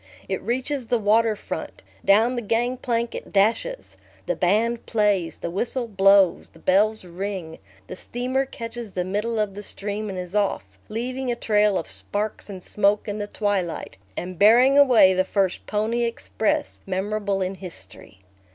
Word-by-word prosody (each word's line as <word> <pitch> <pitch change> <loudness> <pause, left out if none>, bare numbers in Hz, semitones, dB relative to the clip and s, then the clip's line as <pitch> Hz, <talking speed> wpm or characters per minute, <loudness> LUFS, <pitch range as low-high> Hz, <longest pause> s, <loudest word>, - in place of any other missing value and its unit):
It 190 - -2
reaches 255 +3 -2
the 240 - +2
water 220 +1 +3
front; - - -7 0.2
down 225 +5 +4
the 240 - -2
gang 235 +3 0
plank 235 -2 -2
it - - -7
dashes; 225 - 0 0.3
the - - -1
band 225 +6 +1
plays, 205 -6 +1
the 170 - -5
whistle 240 +6 -1
blows, 195 -3 +4
the - - -20
bell 205 +4 +3
rings, 180 -2 -5 0.3
the - - -8
steamer 255 +6 -2
catches 230 -4 -7
the 180 - -1
middle 210 +5 -2
of 210 -2 0
the 205 - -7
stream 210 +1 -4
and 190 - -5
is 180 0 -6
off, 100 - -1
leaving 250 +3 -3
a - - -1
trail 210 -3 +2
of - - -4
sparks 210 +1 -3
and 190 -3 -8
smoke 205 +1 +1
in 205 0 -3
the 205 - -3
twilight, 200 - -2 0.2
and 180 -1 -5
bearing 245 +6 +6
away 250 -9 +7
the 185 0 +2
first 190 -1 -1
"Pony 220 +3 0
Express," 230 -2 -1
memorable 200 +1 -1
in 185 +1 -2
history. 175 - -11
210 Hz, 165 wpm, -24 LUFS, 190-230 Hz, 0.3 s, away